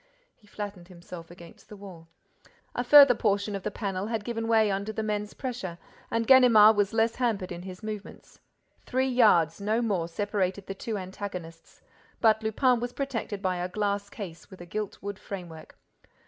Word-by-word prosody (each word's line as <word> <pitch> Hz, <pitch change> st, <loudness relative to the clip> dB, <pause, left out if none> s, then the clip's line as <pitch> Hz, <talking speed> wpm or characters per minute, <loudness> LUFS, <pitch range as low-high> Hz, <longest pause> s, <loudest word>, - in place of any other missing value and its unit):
He 210 Hz, -, -26 dB
flattened 205 Hz, -4 st, -7 dB
himself 170 Hz, -2 st, -11 dB
against 170 Hz, -1 st, -15 dB
the 210 Hz, -, -10 dB
wall. 185 Hz, -5 st, -12 dB, 0.7 s
A 245 Hz, -, -1 dB
further 280 Hz, 0 st, +9 dB
portion 205 Hz, -2 st, 0 dB
of 195 Hz, -, -4 dB
the 210 Hz, -, -3 dB
panel 200 Hz, -2 st, -4 dB
had 225 Hz, -2 st, -2 dB
given 225 Hz, 0 st, -3 dB
way 220 Hz, -2 st, +3 dB
under 200 Hz, +2 st, -2 dB
the 220 Hz, 0 st, -3 dB
men's 210 Hz, -1 st, -3 dB
pressure 235 Hz, -10 st, -5 dB, 0.3 s
and 230 Hz, 0 st, 0 dB
Ganimard 225 Hz, -4 st, +7 dB
was 205 Hz, -1 st, +1 dB
less 225 Hz, 0 st, +1 dB
hampered 220 Hz, -8 st, -1 dB
in 175 Hz, 0 st, -6 dB
his 185 Hz, +2 st, -10 dB
movements. 215 Hz, -1 st, -8 dB, 0.4 s
Three 260 Hz, +1 st, 0 dB
yards, 210 Hz, -, +3 dB
no 215 Hz, +3 st, +1 dB
more, 200 Hz, -8 st, 0 dB
separated 195 Hz, +1 st, -2 dB
the 195 Hz, -, -5 dB
two 215 Hz, +2 st, -4 dB
antagonists. 185 Hz, -3 st, -8 dB, 0.4 s
But 220 Hz, -1 st, +4 dB
Lupin 240 Hz, +3 st, +2 dB
was 245 Hz, +1 st, -4 dB
protected 225 Hz, -7 st, -4 dB
by 185 Hz, -1 st, 0 dB
a 175 Hz, +1 st, -3 dB
glass 200 Hz, 0 st, -2 dB
case 180 Hz, -7 st, -9 dB
with 190 Hz, -, -13 dB
a 175 Hz, -, -9 dB
gilt 210 Hz, +3 st, -4 dB
wood 200 Hz, -1 st, -5 dB
framework. 175 Hz, -6 st, -9 dB
205 Hz, 175 wpm, -27 LUFS, 185-225 Hz, 0.7 s, further